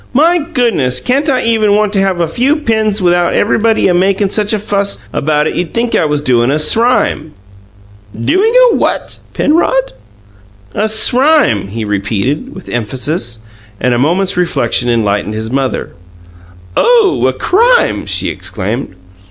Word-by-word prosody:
"My 330 +6 +3
goodness! 235 - 0
Can't 275 - 0
I 260 -2 +1
even 220 -3 +2
want 210 -1 0
to 200 - +1
have 190 -2 0
a 170 - +1
few 250 - +1
pins 220 - -1
without 175 0 +2
everybody 220 -2 +2
makin' 195 +2 +1
such 210 -1 0
a 215 - +1
fuss 200 -1 -2 0.2
about 150 0 0
it - - -2
you'd 175 -2 -4
think 235 0 -1
I - - +2
was 150 -1 -1
doin' 120 -2 +2
a 145 - +1
srime!" 160 -2 +1 0.9
"Doing 390 - +1 0.2
a - - 0
what, - - -2 0.2
Penrod?" - - +1 0.8
"A 215 +1 -1
SRIME!" 250 - +2
he 110 +2 -5
repeated, 110 - -3
with 190 - -11
emphasis; 120 +1 -4 0.4
and 125 - +1
a 120 - 0
moment's 180 +7 +1
reflection 135 -8 0
enlightened 105 -2 -1
his 110 +1 -5
mother. 135 -1 -2 0.8
"Oh, 460 -6 +3
a - - 0
crime!" 475 +6 +1
she - - 0
exclaimed. 105 +1 -5
190 Hz, 150 wpm, -12 LUFS, -, 0.9 s, My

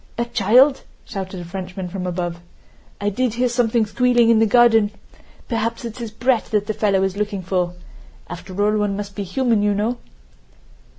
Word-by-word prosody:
"A 235 - 0
child?" 245 +5 +4 0.2
shouted 190 -3 -6
a - - -8
Frenchman 185 +1 -6
from 185 0 -5
above. 175 -1 -3 0.6
"I 205 - 0
did 245 +2 -1
hear 250 +1 +2
something 235 -2 +1
squealing 240 +1 +3
in 225 - +4
the 225 - +4
garden. 225 -2 +5 0.6
Perhaps 230 0 -2
it's 230 +1 -7
his 230 -2 -5
brat 235 +2 0
that 210 -2 -1
the 215 - -2
fellow 200 -3 +1
is 195 0 -2
looking 205 -2 -2
for. 180 -1 -1 0.5
After 185 +2 -8
all, 210 0 +2
one 205 -1 -1
must 205 -1 -6
be 205 - -5
human, 225 +3 +1
you 205 0 +1
know...." 220 +4 -1
210 Hz, 180 wpm, -21 LUFS, 190-235 Hz, 0.6 s, garden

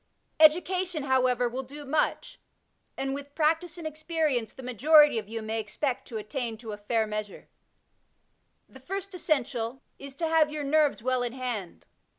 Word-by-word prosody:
Education, 350 +1 +4
however, 255 -2 +2
will 250 +3 -3
do 285 +3 -10
much; 310 - -1 0.6
and 270 0 -2
with 285 0 -7
practice 325 +3 +1
and 335 - -8
ei^rience 310 -6 -1
the 265 - -10
majority 290 +2 +5
of 210 -1 -10
you 225 0 -4
may 220 +1 -2
expect 245 +5 -3
to 230 - -5
attain 225 +2 -4
to 220 -1 -8
a 205 - -5
fair 220 +2 0
measure. 210 -1 -6 1.2
The 265 - -15
first 390 +7 -5
essential 260 -7 -1 0.2
is 275 -1 -9
to 330 +3 -1
have 320 -2 +3
your 300 -1 -4
nerves 290 -4 +2
well 255 0 +1
in 240 -1 -2
hand. 245 -8 -5
270 Hz, 165 wpm, -28 LUFS, 235-310 Hz, 1.2 s, majority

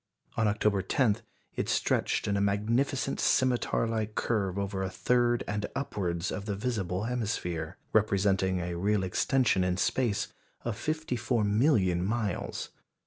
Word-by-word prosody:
On 110 - +2
October 105 -1 +2
10 105 +3 +2 0.4
it - - -2
stretched - - +1
in 100 - +1
a 100 - +1
magnificent 115 +7 0
scimitar 125 -2 +2
like 110 -1 -2
curve 100 -5 0
over 100 -1 -2
a 95 - -1
third 120 +3 +2
and 105 0 -2
upwards 90 -10 -2
of 100 - -4
the 105 -2 -2
visible 100 -4 -2
hemisphere, 105 -9 -2 0.2
representing 95 -3 +2
a 90 0 -3
real 100 +1 +2
extension 105 +2 +2
in 90 0 0
space 115 +1 0 0.4
of 120 -3 -1
fifty 155 +2 -2
four 120 -1 0
million 105 - +3
miles. 105 -1 -2
105 Hz, 140 wpm, -29 LUFS, 95-120 Hz, 0.4 s, million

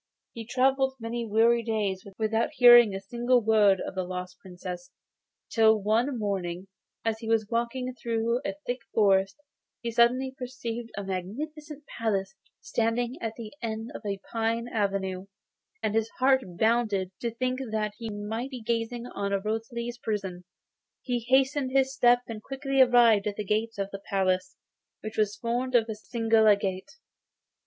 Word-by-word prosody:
He 225 -2 -8
travelled 265 +1 +2
many 230 0 -4
weary 230 +2 +4
days 210 -4 -2
without 220 +1 +1
hearing 240 -6 +8
a - - -3
single 240 +5 +1
word 210 -4 +4
of - - -5
the 185 0 -2
lost 180 0 -6
Princess, 180 -1 -8 0.6
till 220 -1 +5
one 230 +6 +1
morning, 190 -3 -3 0.4
as 220 -1 0
he 225 - -7
was 225 -2 +2
walking 240 +2 -1
through 235 0 -1
a 195 - -3
thick 245 +1 -2 0.2
forest, 195 -1 +3 0.4
he 235 - -4
suddenly 250 +3 +3
perceived 240 -3 -5
a 200 - -3
magnificent 295 - -5
palace 200 -7 -2 0.3
standing 235 +2 -1
at 225 -1 -3
the 225 -3 -8
end 225 0 -4
of - - -7
a 200 -2 -3
pine 230 +1 0
avenue, 195 -3 -2 0.6
and 210 - 0
his 225 0 +1
heart 265 0 +4 0.2
bounded 220 -4 +1
to 235 - -1
think 255 +3 -2
that 215 -1 -1
he 230 -1 -5
might 220 +5 -4
be 255 -4 -8
gazing 235 +1 -2
on 200 -4 -2
Rosalie's 235 +2 -3
prison. 190 -6 -4 0.6
He 245 -2 -1
hastened 265 +1 +3
his 265 0 +3
steps, 245 -1 +4
and 220 -2 -6
quickly 270 +1 0
arrived 235 -5 +5
at 205 - -2
the 210 - -4
gate 220 +3 -1
of 200 0 -3
the 195 - -7
palace, 185 -1 0 0.5
which 215 0 -6
was 210 -1 +1
formed 245 +4 -2
of 230 -2 +4
a 220 - -3
single 225 0 +2
agate. 200 +2 +2
225 Hz, 160 wpm, -27 LUFS, 205-240 Hz, 0.6 s, hearing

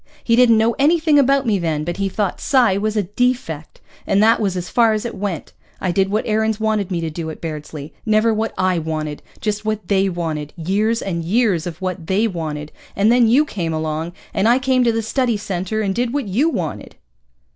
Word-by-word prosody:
He 230 - +3
didn't 235 -2 +5
know 225 +2 +3
anything 310 0 +4
about 275 0 +3
me 210 -4 +1
then, 160 -3 -1
but 175 +2 -4
he 195 -1 -1
thought 200 0 -2
psi 245 -8 +3
was 215 +2 -1
a 210 - +2
defect. 205 - -2 0.3
And - - +2
that 225 +1 +5
was 195 -4 -1
as 180 0 -4
far 230 -2 +3
as 215 +2 -2
it 235 - -4
went. 190 -6 -4 0.3
I 185 - -1
did 195 +1 +1
what 215 +2 0
Aarons 220 0 0
wanted 215 -3 0
me 175 -3 -2
to 165 -1 -3
do 160 0 -5
at 155 - -8
Bairdsley. 150 -2 -6
Never 220 +1 +3
what 220 +1 -1
I 185 -2 +1
wanted, 155 -2 -4 0.2
just 210 0 -2
what 215 -3 -3
they 195 -1 +3
wanted, 160 -4 -4
years 205 +7 0
and 170 -4 -3
years 185 -2 +1
of 170 - -7
what 185 -3 -4
they 205 +4 +2
wanted. 155 -5 -5 0.2
And 205 +3 +3
then 240 -1 +5
you 265 +7 +4
came 170 - -3
along, 155 +2 -3 0.2
and 205 - +2
I 240 +2 +5
came 260 -1 +2
to 235 - +4
the 225 0 -1
Study 240 0 0
Center 195 +2 -3
and 200 -2 0
did 240 +3 -1
what 285 -7 -1
you 250 - +2
wanted." 175 - -4
205 Hz, 220 wpm, -20 LUFS, 170-230 Hz, 0.3 s, didn't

